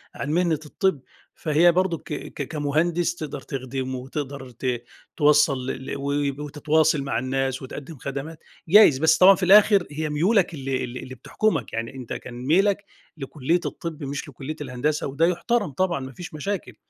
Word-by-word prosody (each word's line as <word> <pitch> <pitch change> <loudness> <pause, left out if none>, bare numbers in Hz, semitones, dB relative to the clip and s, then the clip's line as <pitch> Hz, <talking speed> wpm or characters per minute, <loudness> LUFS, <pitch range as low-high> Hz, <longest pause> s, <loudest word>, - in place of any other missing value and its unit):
عن 145 - -3
مهنة 170 -2 +1
الطِب، 170 -1 0 0.3
فهي 165 +2 +4
برضو 180 -1 +1
ك - - -8
ك 140 - -5
كمهندس 160 +4 0
تقدر 155 -4 -6
تخدمه 130 0 -4
وتقدر 135 0 -6
ت 120 0 -3 0.3
توصَّل 145 -3 +4
ل 130 0 -5
ل - - -3
و 140 +1 -2
وتتواصل 155 +1 +2
مع 115 -5 -1
الناس 130 +1 -1
وتقدِّم 145 +4 -8
خدمات، 140 +5 -6 0.3
جايز، 195 -7 +7
بس 160 +1 +4
طبعًا 195 +2 +8
في 185 - -5
الآخر 200 0 +6
هي 155 +1 -3
ميولك 175 +5 +2
اللي 135 -3 -2
اللي 125 +1 -6
اللي 130 0 -8
بتحكمك، 160 - -1
يعني 115 +3 -4
أنت 125 -3 -6
كان 125 - -7
ميلك 195 +5 +3 0.3
لكُلِّية 150 +4 -1
الطِب 160 -3 -5
مش 140 +2 -5
لكُلِّية 145 +3 -7
الهندسة 140 +3 -1
وده 140 +4 +1
يُحترم 200 +1 0
طبعًا 175 0 0
ما 130 0 -7
فيش 170 +3 -9
مشاكل. 155 - -4
150 Hz, 165 wpm, -24 LUFS, 135-170 Hz, 0.3 s, طبعًا